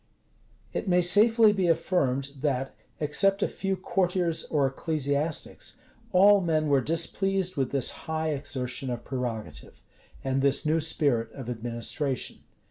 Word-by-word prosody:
It - - -3
may 180 -1 +4
safely 215 +4 +5
be 190 -3 0
affirmed, 140 -5 +1
that, 135 -3 -1 0.3
except 195 +7 +2
a - - +2
few 195 0 -2
courtiers 180 -3 0
or 145 -3 +1
ecclesiastics, 145 +2 -2 0.3
all 200 +2 +6
men 155 -3 0
were 140 -2 +4
displeased 185 +4 0
with 135 -3 0
this 135 -3 +1 0.2
high 160 0 -1
exertion 135 -2 -3
of 120 -1 -4
prerogative, 115 - -5 0.4
and 135 0 0
this 140 +2 +3
new 155 +2 +2
spirit 140 -8 0
of 125 -3 -6
administration. 120 +3 -3
150 Hz, 130 wpm, -27 LUFS, 135-180 Hz, 0.4 s, all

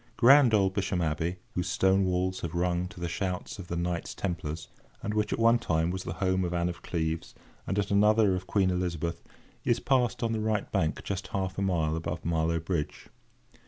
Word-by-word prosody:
Grand 130 0 +7
old 95 -2 +3
Bisham 95 -2 -1
Abbey, 80 +2 -1 0.2
whose 90 0 -2
stone 95 +1 +3
walls 95 0 0
have 85 0 -4
rung 90 0 0
to 90 - -12
the 85 - -2
shouts 90 +2 -3
of 90 - -8
the 85 - -3
Knights 85 0 -2
Templars, 85 -4 -4 0.4
and 105 - -2
which, 105 -1 0
at - - 0
one 115 +1 +5
time, 80 -2 0
was 95 0 -4
the - - -3
home 95 -1 0
of 90 0 -2
Anne 85 0 +1
of 85 0 -7
Cleves 80 -1 -3 0.3
and 95 - -1
at 100 -1 0
another 105 0 +4
of 90 0 -3
Queen 95 -3 +2
Elizabeth, 85 -2 -2 0.4
is 120 0 +2
passed 125 -3 +1
on 115 - +1
the 110 - -1
right 110 -1 -1
bank 80 -1 0
just 95 -1 -4
half 95 -1 -2
a - - -1
mile 80 -5 +1
above 80 - -4
Marlow 85 0 +1
Bridge. 80 -2 -3
90 Hz, 205 wpm, -29 LUFS, 85-100 Hz, 0.4 s, Grand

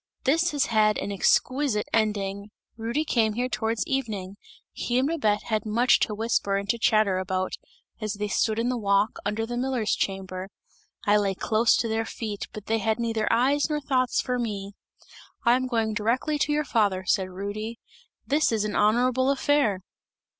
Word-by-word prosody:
This 330 +6 +3
has 290 -3 +1
had 215 -2 +3
an 205 - -3
exquisite 255 +3 +1
ending! 205 -2 0 0.3
Rudy 235 +7 -2
came 225 -7 +2
here 245 +3 -1
towards 225 -2 -1
evening; 210 -8 -3 0.4
he 240 - -2
and 260 +2 +2
Babette 220 -11 0
had 215 -2 -1
much 235 +4 +3
to 210 - 0
whisper 210 -2 0
and 200 0 -4
to 235 - +1
chatter 215 -5 +3
about, 185 0 -2 0.5
as 215 -1 -2
they 210 0 -3
stood 215 +2 0
in 235 +2 0
the 250 -1 -1
walk, 200 0 +1
under 215 +2 -1
the 240 +1 -4
miller's 250 -4 0
chamber. 190 -1 -3 0.6
I 205 +1 +5
lay 200 -2 0
close 220 +4 +2
to 230 - 0
their 225 0 -1
feet 215 -3 -5
but 210 -1 -9
they 225 0 0
had 220 0 0
neither 225 -2 0
eyes 275 +6 +2
nor 300 -1 0
thoughts 255 -3 0
for 250 -1 -2
me. 205 -4 -4 0.7
'I 235 - +6
am 255 0 -1
going 225 -3 0
directly 245 +8 0
to 295 - +1
your 300 0 +1
father,' 200 -7 +1
said 185 0 +1
Rudy, 205 +5 -5 0.5
'this 295 0 +2
is 215 -2 0
an 210 - -3
honourable 250 +5 +3
affair!' 275 -8 +2
220 Hz, 180 wpm, -26 LUFS, 205-250 Hz, 0.7 s, I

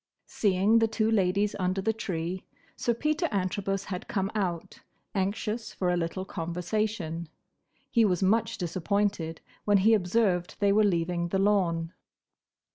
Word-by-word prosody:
Seeing 205 +2 +3
the 225 - +3
two 220 0 0
ladies 200 0 +2
under 185 +1 0
the 220 +3 +1
tree, 180 -4 -3 0.3
Sir 235 - 0
Peter 305 +7 0
Antrobus 195 0 -1
had 185 -2 -6
come 195 0 -1
out, 180 -6 -3 0.3
anxious 210 +3 -2
for 180 -2 0
a - - +2
little 175 +2 -2
conversation. 175 -1 -3 0.6
He 230 - +4
was 185 -4 +2
much 220 +4 +2
disappointed 180 -1 -1 0.2
when 205 -1 +4
he 215 +4 +5
observed 185 -2 +1
they 200 -1 +3
were 215 +1 +5
leaving 170 -2 +1
the 195 - -1
lawn. 180 -5 +1
195 Hz, 140 wpm, -28 LUFS, 175-210 Hz, 0.6 s, he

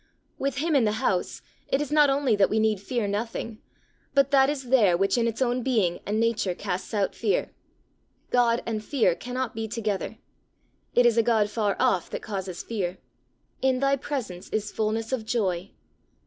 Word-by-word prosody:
With 275 0 -1
him 315 +2 +1
in 270 - +5
the 210 -1 +2
house, 215 -6 -1 0.2
it 270 - +1
is 295 -1 -3
not 300 -1 +5
only 270 -4 +2
that 200 -1 +3
we 220 - 0
need 215 -2 +2
fear 230 +1 -2
nothing, 220 +2 -3 0.6
but 275 0 +4
that 270 -1 +5
is 270 -4 -4
there 210 -9 +5
which 195 +2 +2
in 235 -1 +2
its 230 +3 0
own 245 0 0
being 215 -9 +1
and 210 +2 0
nature 230 -5 +1
casts 180 +1 -4
out 205 -3 0
fear. - - 0 0.8
God 240 -1 +3
and 220 -2 -3
fear 225 - +2
cannot 250 +6 -4
be 225 0 -3
together. 215 -3 -3 0.8
It 245 - +5
is 235 -1 +4
a - - +7
God 220 -2 +2
far 210 -3 0
off 180 - +2
that - - -5
causes 190 -4 -5
fear. 190 -5 -3 0.6
"In 260 -1 +2
thy 275 +1 +3
presence 250 -10 -5
is 210 -1 -2
fulness 220 +1 -1
of 255 -4 -1
joy." 195 -5 -1
225 Hz, 185 wpm, -26 LUFS, 205-255 Hz, 0.8 s, a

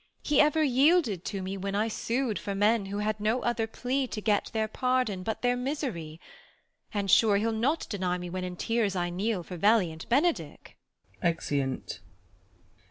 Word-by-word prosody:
He 295 -2 +4
ever 300 +1 +3
yielded 270 - +3
to 195 -3 -3
me 190 +1 -4
Avhen 195 +1 -3
I 215 +2 +1
su'd 230 -1 -1
For 200 - -4
men 205 +1 +2
who 200 +1 -4
had 210 0 -1
no 220 +4 0
other 235 -2 0
plea 255 +4 -2
to 220 - -5
get 210 -1 +1
Tlieir 220 -1 -2
pardon 250 -7 0
but 220 +5 -4
their 245 0 +3
misery; 245 - -4 0.7
and, 200 -2 -1
sure, 210 0 +5
He'll 225 +3 0
not 255 +9 0
deny 185 -3 -1
me 180 0 -6
when 185 +1 -4
in 180 0 -5
tears 220 0 0
I 175 -1 -1
kneel 195 +1 -1
For 180 +1 -8
valiant 180 -5 +2
Benedick. 240 - 0 0.5
[Exeunt. 140 - -1
215 Hz, 170 wpm, -28 LUFS, 185-245 Hz, 0.7 s, sure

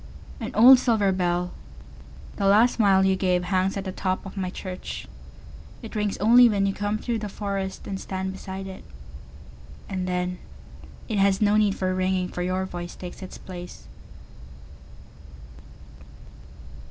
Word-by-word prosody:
An 225 - -4
old 250 +4 +9
silver 220 -6 +2
bell, 180 -1 0 0.9
the 200 - +1
last 220 +5 +5
smile 195 -4 +4
you 190 0 +3
gave, 180 -2 +1
Hangs 185 +1 0
at 195 - -3
the 190 - -3
top 185 0 -2
of 195 - -9
my 190 -2 -2
church.It 185 +4 -10
rings 210 -2 -1
only 240 +3 +6
when 200 -2 +1
you 195 - 0
come 205 +1 -2
through 230 +1 -2
the 210 - -4
forestAnd 195 -1 -4
stand 190 0 -4
beside 190 0 -7
it. 190 -1 -9 1.0
And 185 -2 -3
then, 180 0 -2 0.7
it 215 -4 -1
has 195 -1 +3
no 210 -1 +3
need 210 -2 +3
for 185 -1 -1
ringing, 185 0 0
For 180 - -5
your 185 +1 -1
voice 175 -1 -7
takes 180 +1 -9
its 185 - -8
place. 175 - -10
190 Hz, 145 wpm, -25 LUFS, 185-205 Hz, 1.0 s, old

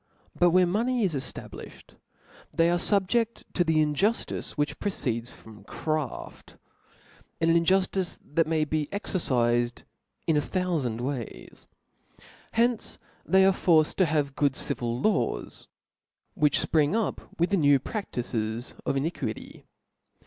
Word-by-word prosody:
But 175 - +4
where 180 +1 +5
money 230 +6 +1
is 185 -5 +1
eftablifhed, 135 -3 -7 0.6
they 165 +2 +3
arc 175 0 +1
fubjcft 220 +3 +1
to 175 - +2
that 160 - +1
injuftice 155 +8 0
which 145 0 -2
proceeds 120 - -2
from 110 -4 -14
craft 155 +6 -4 0.8
i - - +2
an - - +3
injuftice 185 +2 +2
that 165 +2 +1
may 160 -1 +1
beexercifed 130 - 0 0.4
a - - +4
thouftnd 150 - -1
ways. 125 -3 -6 0.9
Hence 235 0 +1 0.3
they 190 0 +5
are 195 - +5
forced 160 -5 +3
to 185 - +5
have 145 -3 0
good 140 -2 +2
civil 120 -1 -2
Jaws, 215 -1 -1 0.7
which 150 -1 +2
fpring 155 +3 +2
up 225 -6 -3
with 170 +4 +2
the 200 - +3
new 145 -4 +5
praftices 120 - -4
of 140 - +1
iniquity. 155 +6 -4
160 Hz, 125 wpm, -27 LUFS, 135-190 Hz, 0.9 s, where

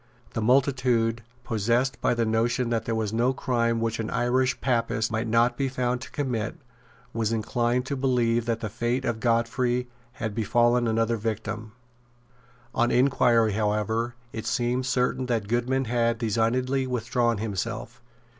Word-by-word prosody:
The 115 - -2
multitude, 125 -2 +2 0.2
possessed 120 +3 0
by - - +2
the 115 -1 +1
notion 115 +2 +1
that 115 -1 0
there 115 - -1
was 110 -1 -2
no 120 +3 +2
crime 115 -3 0
which 115 0 -1
an 110 - -2
Irish 125 +1 +1
Papist 115 -3 0
might 115 +1 -1
not 120 +2 +2
be 135 -1 0
found 125 -1 -1
to - - -8
commit, 125 -6 -2 0.6
was 115 -1 0
inclined 120 +3 0
to 140 - -2
believe 120 -3 +1
that 115 -1 -1
the 110 - -3
fate 120 +3 -1
of 115 -2 -1
Godfrey 120 +2 +1 0.3
had 115 -5 -4
befallen 120 +2 +2
another 115 +1 +1
victim. 110 0 -4 1.0
On 120 -1 +2
inquiry 120 -3 +3
however 110 +3 -1 0.2
it 110 - -5
seemed 125 +1 0
certain 125 0 0
that 115 -4 -1
Goodman 125 +4 0
had 115 0 +1
designedly 125 +4 0
withdrawn 120 -1 0
himself. 115 +3 -4
120 Hz, 150 wpm, -26 LUFS, 115-125 Hz, 1.0 s, inquiry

